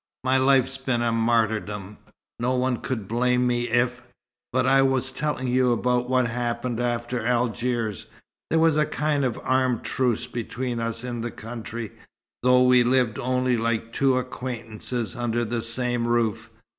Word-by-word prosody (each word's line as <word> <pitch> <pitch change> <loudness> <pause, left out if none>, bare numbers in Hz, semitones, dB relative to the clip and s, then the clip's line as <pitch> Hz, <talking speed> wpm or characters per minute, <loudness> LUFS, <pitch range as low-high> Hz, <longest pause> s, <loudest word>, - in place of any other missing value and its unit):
My 130 +1 +3
life's 135 0 +3
been 130 -3 0
a 120 - +1
martyrdom. 110 -3 0 0.4
No 125 +2 +1
one 125 -1 +1
could 110 -6 -4
blame 125 +2 +2
me 120 -1 0
if 120 +1 +1 0.5
but 130 0 +1
I 135 +1 +5
was 130 -1 +1
telling 130 -1 -2
you 125 0 +3
about 125 +1 +1
what 130 -1 +3
happened 120 0 -2
after 120 0 -1
Algiers. 120 -2 -1 0.4
There 160 - +2
was 160 -1 +4
a 150 0 +3
kind 150 -1 0
of 125 -3 -1
armed 130 -2 +1
truce 125 -4 0
between 120 +1 -4
us 115 0 -3
in 120 -2 -4
the 120 - -3
country, 115 -1 -7 0.5
though 125 0 +5
we 125 -1 +6
lived 125 -1 +2
only 125 -1 +1
like 115 0 -1
two 135 -1 +2
acquaintances 120 -2 -4
under 120 -1 -1
the 115 +1 -2
same 120 +1 -1
roof. 120 -3 0
120 Hz, 155 wpm, -25 LUFS, 115-130 Hz, 0.5 s, we